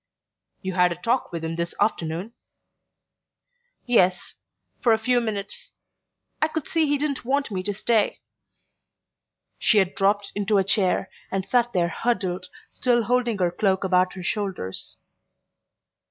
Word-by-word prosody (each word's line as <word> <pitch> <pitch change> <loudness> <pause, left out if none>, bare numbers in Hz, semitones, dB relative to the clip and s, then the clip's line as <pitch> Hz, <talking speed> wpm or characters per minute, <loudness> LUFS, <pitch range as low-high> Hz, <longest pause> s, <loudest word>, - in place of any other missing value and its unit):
"You 190 0 -3
had 180 -1 +4
a - - -2
talk 235 +9 -1
with 165 -1 -5
him 165 +1 -3
this 170 0 -2
afternoon?" 185 0 -1 1.5
"Yes: 185 -7 +2 0.5
for 235 - +4
a - - +3
few 245 +2 +2
minutes. 205 -3 -4 0.7
I 310 - +4
could 315 -2 -4
see 325 -2 +2
he 290 0 +2
didn't 285 -1 -2
want 275 0 0
me 185 -2 -2
to 205 +2 -2
stay." 215 +1 +1 1.4
She 215 - +3
had 190 -2 +3
dropped 200 +1 +1
into 205 0 +1
a 195 - +4
chair, 190 -1 +1 0.2
and 190 -1 -2
sat 240 +3 +1
there 170 -2 +2
huddled, 185 -3 -1 0.2
still 240 -2 +2
holding 240 -1 +1
her 180 -3 +1
cloak 190 +1 +1
about 185 -1 +2
her 185 - -8
shoulders. 190 - -3
200 Hz, 145 wpm, -24 LUFS, 185-240 Hz, 1.5 s, had